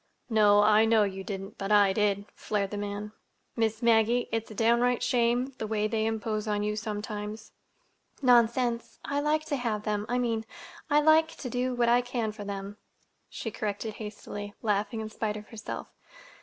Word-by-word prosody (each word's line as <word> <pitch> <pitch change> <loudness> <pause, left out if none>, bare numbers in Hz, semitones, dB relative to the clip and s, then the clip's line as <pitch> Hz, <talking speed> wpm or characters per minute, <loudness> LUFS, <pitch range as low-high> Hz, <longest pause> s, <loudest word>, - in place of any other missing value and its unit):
"No, 205 -2 +6
I 215 +1 +5
know 220 -1 +4
you 195 -1 -3
didn't, 195 0 -6
but 195 +1 -3
I 205 -2 +5
did," 205 -1 +1
flared 200 -2 -2
the - - -3
man. 205 +1 -4 0.4
"Miss 225 0 0
Maggie, 235 +1 +3
it's 225 0 -2
a 215 - -9
downright 235 +3 +2
shame—the 245 0 +1
way 215 -1 0
they 220 0 0
impose 220 -1 -2
on 205 -1 0
you 210 0 -1
sometimes." 210 0 -5 0.7
"Nonsense! 240 -1 +2
I 285 - -1
like 305 +1 +1
to 295 -3 -1
have 225 -4 -2
them—I 210 +3 -1
mean, 230 -3 0 0.5
I 295 0 +5
like 315 +1 +5
to 250 - -6
do 250 0 -1
what 240 -1 +2
I 240 +1 +5
can 240 -3 -2
for 210 -1 -8
them," 200 0 -6 0.5
she 225 - -5
corrected 210 +1 -3
hastily, 205 -1 -7
laughing 210 +1 0
in 215 - -5
spite 215 -1 -2
of 210 - -11
herself. 225 -2 -7
220 Hz, 170 wpm, -28 LUFS, 210-240 Hz, 0.7 s, No